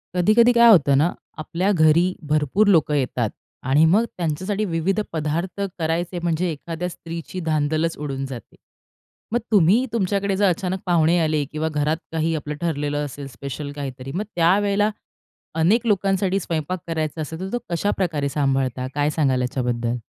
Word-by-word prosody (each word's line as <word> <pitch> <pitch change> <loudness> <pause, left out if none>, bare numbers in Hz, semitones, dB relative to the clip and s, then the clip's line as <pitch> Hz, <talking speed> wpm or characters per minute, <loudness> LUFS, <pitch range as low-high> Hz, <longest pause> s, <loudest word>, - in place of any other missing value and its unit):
कधी-कधी 215 +7 +5
काय 235 0 +7
होतं 145 -10 +6
ना, 160 +5 +3 0.3
आपल्या 175 +5 -1
घरी 170 +1 +4 0.2
भरपूर 155 +8 +2
लोकं 160 -6 +4
येतात 125 -5 0 0.3
आणि 140 +5 +4
मग 205 +8 +4
त्यांच्यासाठी 185 +6 -1
विविध 180 +3 0
पदार्थ 165 +5 -2 0.2
करायचे 170 +2 -1
म्हणजे, 175 +1 0
एखाद्या 165 +3 -5
स्त्रीची 165 +1 -7
धांदलच 155 +1 0
उडून 135 -2 -4
जाते. 130 -5 -9 0.8
मग 240 - +3
तुम्ही 205 +5 +4
तुमच्याकडे 200 -2 0
जर 200 -1 +4
अचानक 185 +2 -2
पाहुणे 170 -1 +3
आले 155 -2 +1
किंवा 155 +1 -2
घरात 150 +1 0
काही 160 0 0
आपलं 150 -1 -4
ठरलेलं 145 -3 -1
असेल, 140 0 -7
स्पेशल 140 +3 -6
काहीतरी 135 -2 -6
मग 185 +8 -2
त्यावेळेला 200 +4 +3 0.7
अनेक 210 +9 +3
लोकांसाठी 195 -1 +1
स्वयंपाक 165 0 -3
करायचा 160 -1 -2
असेल, 160 +2 -6
तर 190 +1 -4
तो 245 - 0
कशाप्रकारे 170 -5 -1
सांभाळता, 135 -3 0
काय 145 0 +2
सांगाल 135 -5 +1
याच्याबद्दल? 120 -2 -1
160 Hz, 150 wpm, -22 LUFS, 145-185 Hz, 0.8 s, काय